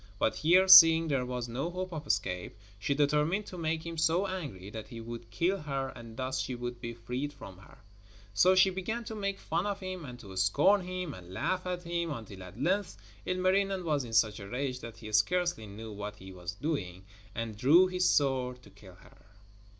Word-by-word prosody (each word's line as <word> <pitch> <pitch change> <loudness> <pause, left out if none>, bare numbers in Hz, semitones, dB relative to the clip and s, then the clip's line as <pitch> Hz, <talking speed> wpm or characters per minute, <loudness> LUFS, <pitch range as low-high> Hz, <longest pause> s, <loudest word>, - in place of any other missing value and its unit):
But 110 - 0
here, 180 +5 +4
seeing 165 -3 +10
there 130 -3 0
was 125 -1 -3
no 130 +8 -3
hope 185 0 -5
of 155 -2 -6
escape, 90 +2 -2 0.2
she 140 +8 0
determined 150 +7 +1
to - - -9
make 160 0 -2
him 165 -1 -5
so 165 +4 +2
angry 140 - -6
that 110 -1 -7
he 115 -2 -9
would 115 0 -8
kill 185 +8 0
her 135 -3 -3
and 115 -2 -11
thus 130 0 -2
she 125 - -4
would 120 0 -6
be 115 -1 -5
freed 125 +5 -4
from 100 -10 -12
him. 100 - -16 0.6
So 185 - +5
she 190 +1 +5
began 205 +6 -3
to 225 - -7
make 200 -2 -2
fun 170 +3 -2
of 200 -1 -2
him 185 -2 -6
and 125 -2 -9
to 95 -3 -11
scorn 145 - +4
him 180 -3 -5
and 90 -1 -12
laugh 185 - -2
at 180 -1 -3
him, 170 0 -2
until 110 -9 -7
at 90 +4 -11
length 185 +7 0 0.3
Ilmarinen 185 +1 +1
was 150 -4 +1
in 115 -2 -9
such 110 -2 +3
a 100 -1 -9
rage 130 +1 -3
that 115 -2 -9
he 110 -1 -9
scarcely 165 - +1
knew 110 +2 -9
what 105 +1 -6
he 95 -2 -11
was 90 -1 -6
doing, 95 - -4 0.3
and 115 -1 -4
drew 150 - +6
his 180 -1 +1
sword 130 -3 +1
to 100 - -16
kill 95 -2 -15
her. 95 - -20
140 Hz, 210 wpm, -30 LUFS, 110-180 Hz, 0.6 s, seeing